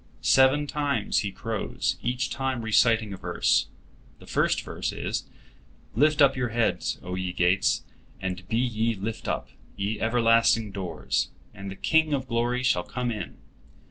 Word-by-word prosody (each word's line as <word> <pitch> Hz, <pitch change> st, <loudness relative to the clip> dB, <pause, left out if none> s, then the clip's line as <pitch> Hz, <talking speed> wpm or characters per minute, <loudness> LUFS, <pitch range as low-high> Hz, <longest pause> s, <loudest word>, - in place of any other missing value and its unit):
Seven 135 Hz, +3 st, +5 dB
times 145 Hz, -1 st, 0 dB
he 100 Hz, -, -2 dB
crows, 110 Hz, +2 st, -3 dB
each 125 Hz, +1 st, -1 dB
time 135 Hz, -3 st, -2 dB
reciting 110 Hz, -1 st, +3 dB
a -, -, -7 dB
verse. -, -, +1 dB, 0.5 s
The -, -, -15 dB
first -, -, +1 dB
verse -, -, -3 dB
is: -, -, -3 dB, 0.7 s
"Lift 150 Hz, +4 st, +4 dB
up 135 Hz, -1 st, +5 dB
your 125 Hz, -2 st, -1 dB
heads, 115 Hz, 0 st, 0 dB
O 90 Hz, -, -5 dB
ye 90 Hz, 0 st, -2 dB
gates; 90 Hz, +2 st, +2 dB, 0.4 s
and 90 Hz, -1 st, -4 dB
be 110 Hz, -, 0 dB
ye 115 Hz, -2 st, 0 dB
lift 105 Hz, +3 st, -5 dB
up, -, -, -2 dB, 0.3 s
ye 105 Hz, +2 st, -2 dB
everlasting 115 Hz, -1 st, +3 dB
doors, 95 Hz, -3 st, -2 dB, 0.2 s
and 100 Hz, -1 st, -7 dB
the 95 Hz, -, -7 dB
King 160 Hz, -, +2 dB
of 130 Hz, -1 st, -4 dB
glory 120 Hz, +1 st, 0 dB
shall 120 Hz, -9 st, +3 dB
come 125 Hz, +3 st, -3 dB
in. 105 Hz, -2 st, -6 dB
115 Hz, 155 wpm, -26 LUFS, 100-130 Hz, 0.7 s, Seven